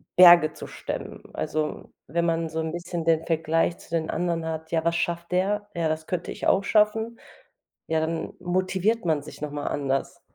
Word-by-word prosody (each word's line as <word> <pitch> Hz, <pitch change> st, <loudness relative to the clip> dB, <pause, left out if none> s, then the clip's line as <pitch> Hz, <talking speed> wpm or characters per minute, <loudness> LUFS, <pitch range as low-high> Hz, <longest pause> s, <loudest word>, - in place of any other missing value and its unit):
Berge 175 Hz, -3 st, +8 dB
zu -, -, -8 dB
stemmen. -, -, -6 dB
Also, 150 Hz, -, -3 dB, 0.2 s
wenn 170 Hz, +4 st, 0 dB
man 165 Hz, -1 st, 0 dB
so 160 Hz, -, -3 dB
'n 160 Hz, 0 st, -2 dB
bisschen 175 Hz, -1 st, -4 dB
den 165 Hz, -1 st, +3 dB
Vergleich 165 Hz, +1 st, +1 dB
zu -, -, -17 dB
den 160 Hz, -1 st, 0 dB
anderen 170 Hz, -1 st, -1 dB
hat: 160 Hz, 0 st, -5 dB
„Ja, 165 Hz, -1 st, +1 dB
was 170 Hz, 0 st, +2 dB
schafft 170 Hz, 0 st, -2 dB
der? 205 Hz, +3 st, 0 dB
Ja, 165 Hz, -1 st, +1 dB
das 155 Hz, 0 st, -2 dB
könnte 180 Hz, -1 st, -3 dB
ich -, -, -3 dB
auch 195 Hz, -, +4 dB
schaffen.” 220 Hz, +2 st, +2 dB, 0.7 s
Ja, 160 Hz, 0 st, +1 dB
dann 160 Hz, 0 st, -2 dB
motiviert 185 Hz, +4 st, 0 dB
man 155 Hz, -3 st, +2 dB
sich -, -, -11 dB
noch 150 Hz, -, -3 dB
mal 145 Hz, 0 st, -4 dB
anders. 135 Hz, -1 st, -1 dB
165 Hz, 190 wpm, -26 LUFS, 160-180 Hz, 0.7 s, Berge